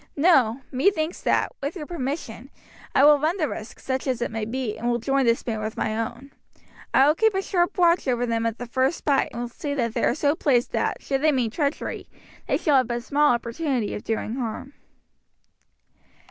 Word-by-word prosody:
No; 270 -7 +4
methinks 315 +4 0
that, - - +1
with 280 +5 -3
your 315 -5 -6
permission, 270 -6 -5 0.5
I 275 - +6
will 295 -1 +7
run 315 +6 0
the 310 -5 0
risk, 215 -4 -7
such 260 +1 -3
as 255 -3 0
it 240 - -2
may 220 -1 -3
be, 235 -1 -3
and 240 - -2
will 240 - +1
join 270 +2 +1
this 230 0 +2
band 220 -3 -3
with 215 0 -5
my 215 - -1
own. 235 +5 -5 0.6
I 270 - +5
will 300 - +5
keep 440 +4 +2
a 385 - +1
sharp 355 +1 0
watch 345 -3 +3
over 245 -1 +1
them 230 -1 0
at 230 0 -3
the 245 - -6
first 260 +6 -1
fight, 280 -2 +2
and 240 - -4
will - - -3
see 285 +4 -4
that 235 -5 -1
they - - -1
are - - +2
so 290 -1 +2
placed 260 -6 +1
that, - - -1
should 270 -1 -1
they 310 0 +4
mean 250 -5 0
treachery, 285 +3 -3 0.4
they - - +2
shall 290 -3 +3
have 255 -3 +2
but 240 0 -3
small 295 +2 +3
opportunity 235 0 -2
of - - -6
doing 225 +1 -3
harm." 255 +3 -5
265 Hz, 215 wpm, -24 LUFS, 235-295 Hz, 0.6 s, will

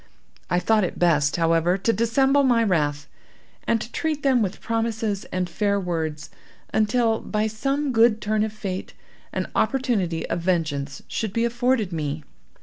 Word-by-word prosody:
I 180 - +2
thought 215 +4 +3
it 180 - -3
best, 150 -4 +3
however, 165 +2 +2
to 225 +4 +1
dissemble 265 +6 +3
my 245 -4 +3
wrath, 150 -7 0 0.6
and 230 - +2
to 220 - -7
treat 310 -3 -2
them 260 -4 +3
with 195 -3 -2
promises 225 -3 -2
and 180 0 -2
fair 200 +2 0
words, 160 -4 -3 0.4
until, 225 +1 +2
by 215 0 -1
some 275 +6 -1
good 225 -2 +4
turn 215 0 0
of 220 - -2
fate, 195 -3 -5 0.4
an - - -2
opportunity 210 - 0
of 170 - -2
vengeance 155 -6 -1
should 215 -3 -3
be 230 +1 +1
afforded 235 -4 0
me. 150 -1 -3
210 Hz, 155 wpm, -24 LUFS, 170-230 Hz, 0.6 s, good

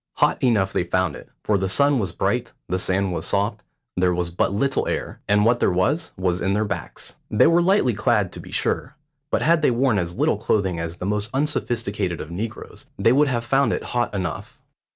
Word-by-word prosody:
Hot - - +1
enough 105 -7 +2
they - - +1
found 90 -2 0
it, - - -12
for 105 -2 +1
the 95 0 -1
sun 140 +6 +3
was 95 -6 -2
bright, - - -1
the 90 - -1
sand 95 0 0
was - - -3
soft, 100 +1 0 0.3
there 90 -1 +2
was 85 -1 -2
but 85 - 0
little 135 +7 0
air, - - -3
and 105 0 +3
what 120 +1 +3
there - - +3
was 95 - 0
was 90 -1 0
in 95 +2 +1
their 105 +1 +1
backs. 100 -1 -6
They 105 - +4
were 170 +1 +5
lightly 175 - +3
clad, 105 -3 +1
to - - -9
be - - -11
sure; - - -1 0.3
but - - 0
had 165 +1 +3
they 150 - +4
worn 120 -3 +2
as 85 -1 -4
little - - +2
clothing 95 -5 0
as 85 0 -4
the 90 - -5
most 105 +1 -1
unsophisticated 115 - -1
of 80 - -7
negroes, 110 +6 -6
they 115 - +3
would 145 +2 +4
have 120 -3 -1
found 135 +3 +2
it - - -3
hot 120 -1 0
enough. 95 -2 -5
105 Hz, 215 wpm, -23 LUFS, 95-125 Hz, 0.3 s, were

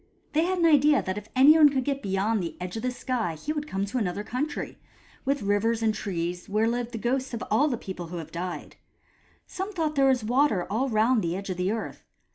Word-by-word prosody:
They 315 +2 +3
had 370 +1 0
an 340 - +2
idea 295 -2 +5
that 190 +2 -3
if 210 - -16
anyone 295 +3 +8
could 265 -2 -1
get 275 +1 -2
beyond 200 +1 0
the 170 - -5
edge 180 +2 -5
of 225 - -3
the 255 - 0
sky 245 -8 -2
he 295 - -4
would 295 -1 -4
come 195 -7 -2
to 220 +6 -2
another 200 -1 -2
country, 280 +7 -4 0.5
with 275 -1 0
rivers 220 +3 +1
and 220 -1 +2
trees, 180 -4 -4
where 215 +2 +2
live 240 0 -2
the 230 - -5
ghosts 255 +2 -1
of 225 - -5
all 270 +8 +4
the 250 -5 -1
people 185 -5 -7
who 175 +1 -6
have 160 -1 -7
died. 175 +1 -6 0.7
Some 385 +2 -5
thought 330 -6 0
that 305 - -10
there 270 - +5
was 255 -4 +2
water 240 -5 +2
all 255 +6 0
round 225 +1 +3
the 170 -1 -1
edge 195 0 -5
of 180 - -4
the 180 +2 0
earth. 225 0 -5
225 Hz, 240 wpm, -26 LUFS, 195-275 Hz, 0.7 s, anyone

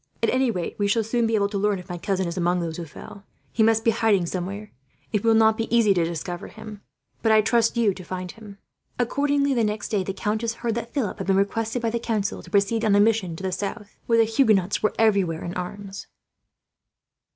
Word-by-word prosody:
At 230 - +3
any 260 -1 +2
rate, 180 -4 -4
we 205 - +2
shall 225 +2 +2
soon 230 +1 0
be 225 - +1
able 200 -1 +2
to 200 -1 -2
learn 205 0 +1
if 180 0 -10
my 175 -2 -6
cousin 190 -1 -1
is 170 - -4
among 180 0 +1
those 165 -2 -4
who 170 - -5
fell. 145 - -11
If - - -10
not, 200 0 -16 0.3
he 225 - -1
must 225 0 +3
be 230 - +4
in 225 - -5
hiding 205 -5 +3
somewhere. 195 +4 -5 0.4
It 210 - 0
will 225 -1 +4
not 220 0 +4
be 225 - -2
easy 220 -4 +5
to 175 -3 +1
discover 170 +1 -4
him, 210 -2 -10 0.4
but 225 - +2
I 215 0 +6
trust 230 +2 +2
to 235 - +1
you 210 -4 +3
to 185 - -10
find 180 0 -5
him." 210 -3 -13 0.4
Accordingly, 280 +3 +1
the 235 -3 +1
next 210 0 -2
day, 205 -3 0
the 195 - -3
countess 220 +4 -2
heard 230 - +1
that 235 +1 -5
Philip 220 -7 -2
had 190 - -4
been 195 - +3
requested 225 +4 0
by 230 - +1
the 235 - -1
council 215 -4 -2
to - - -14
proceed 205 +3 +1
on 210 -2 +3
a - - +5
mission 205 -5 +2
to 190 - -9
the 190 - -1
south, 205 +2 -5
where 230 - +3
the 225 - +6
Huguenots 215 -4 +2
were 215 - +1
everywhere 195 -7 +2
in 175 - -5
arms. 195 +2 -6
210 Hz, 250 wpm, -24 LUFS, 190-225 Hz, 0.4 s, I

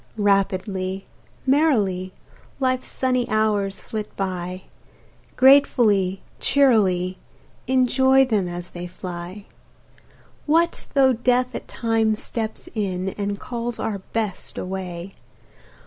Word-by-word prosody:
Rapidly, 195 -1 0 0.4
merrily, 220 - +2 0.5
Life's 255 -1 0
sunny 255 -2 0
hours 210 -2 0
flit 215 -1 -6
by, 185 -1 -3 0.7
Gratefully, 230 -8 +4 0.2
cheerily, 190 -10 +3 0.5
Enjoy 260 +1 +4
them 210 -7 0
as 175 0 -6
they 175 0 -6
fly. 180 +2 -7 1.0
What 335 +3 +2
though 265 -2 +5
death 250 +1 +1
at - - -6
times 225 -2 0
steps 220 -2 -4
in, 190 -4 -2
And 200 +1 -3
calls 240 -1 -4
our 215 -3 -2
Best 215 -4 -3
away? 185 -1 -5
210 Hz, 100 wpm, -23 LUFS, 185-250 Hz, 1.0 s, though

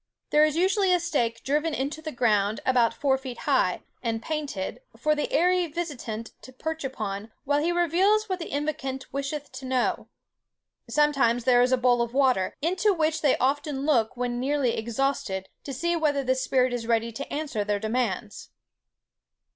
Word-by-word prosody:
There 300 - +6
is 305 -1 +2
usually 380 +2 +2
a 360 - +4
stake 240 -9 -1
driven 300 +3 0
into 285 +4 -3
the 310 0 -5
ground 215 -4 +1
about 245 -3 +3
four 265 -2 +1
feet 260 -3 -7
high, 260 -11 +1 0.2
and 230 -2 -1
painted, 290 - -4 0.2
for 305 - +2
the 295 - -2
airy 360 +1 +3
visitant 285 -9 -5
to 260 - -12
perch 320 +4 -4
upon 215 -5 -4
while 290 +1 +1
he 335 +3 +1
reveals 365 +6 +2
what 375 -2 -2
the 335 - -6
invocant 285 -3 -3
wisheth 280 +1 -4
to 265 - -8
know. 255 -1 0 0.8
Sometimes 275 -6 +2
there 245 0 +5
is 250 +1 +3
a 255 - +4
bowl 245 -1 +3
of 235 +1 -3
water, 255 -9 +2
into 375 +4 +2
which 320 -1 0
they 285 -4 +3
often 280 +1 0
look 245 -6 +2
when 245 0 -2
nearly 270 -2 +1
exhausted, 225 -5 -2 0.2
to 280 - -5
see 340 +6 0
whether 295 -4 +1
the 260 0 +2
spirit 255 -1 +1
is 235 -2 -3
ready 230 0 +1
to 275 +5 -7
answer 285 -8 -2
their 205 0 0
demands." 220 -2 -2
270 Hz, 175 wpm, -26 LUFS, 235-310 Hz, 0.8 s, There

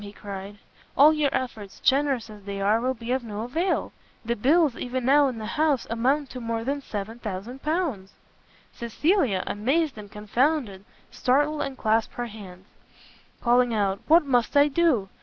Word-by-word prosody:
he 200 -1 -9
cried, 200 0 -8 0.4
"all 300 +3 +7
your 300 -2 +1
efforts, 220 -6 -4
generous 275 -4 +2
as 210 -2 -12
they 200 -1 -5
are, 210 +3 +2
will 260 +1 0
be 230 +1 -6
of 260 -1 0
no 215 -2 -5
avail! 325 +11 -1 0.3
the 235 +1 0
bills 285 +4 +3
even 250 0 -4
now 285 +2 +5
in 250 -3 -4
the 220 - -6
house 295 +2 +1
amount 265 +5 +1
to 255 - -8
more 230 -1 -3
than 280 +3 -2
L7000!" 225 - -4 0.6
Cecilia, 235 - 0
amazed 270 +5 0
and 205 -1 -11
confounded, 215 -1 -1 0.3
started 290 +4 +1
and 270 -1 -4
clasped 220 0 0
her 240 - -3
hands, 195 -5 -11 0.8
calling 245 -1 +3
out, 200 -2 0
"What 325 0 +6
must 245 0 +1
I 285 +1 +6
do! 285 - +2
245 Hz, 160 wpm, -25 LUFS, 210-285 Hz, 0.8 s, all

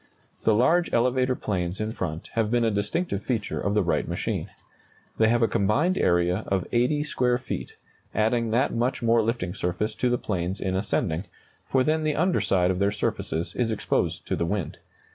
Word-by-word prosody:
The 110 - +5
large 170 +10 +3
elevator 125 +2 +2
planes 90 -5 -2
in 110 0 -2
front 85 -6 -5
have 110 -2 +1
been 120 +1 +2
a 115 - +2
distinctive 105 - -1
feature 115 -2 -2
of 100 0 0
the 105 - +3
Wright 85 - 0
machine. - - -3 0.7
They 110 - +5
have 120 0 +3
a - - +5
combined 110 - +2
area 90 - +2
of 95 -2 0
80 125 +5 +2
square 125 -4 +1
feet, 125 - -5 0.4
adding 115 +1 +1
that 120 +4 +1
much 120 +2 -1
more 115 0 +4
lifting 110 -6 -2
surface 95 +6 -2
to 125 +3 0
the 125 - +2
planes 95 -3 -3
in 95 -1 -1
ascending, 95 -3 -1 0.4
for 130 -1 +3
then 155 +3 +1
the 155 -1 0
under 180 +3 +2
side 90 -1 +2
of 90 - -2
their 100 0 +2
surfaces 85 -4 -2
is 120 -2 0
exposed 110 - -1
to - - -1
the 85 - -1
wind. 100 -4 -3
110 Hz, 190 wpm, -26 LUFS, 95-125 Hz, 0.7 s, The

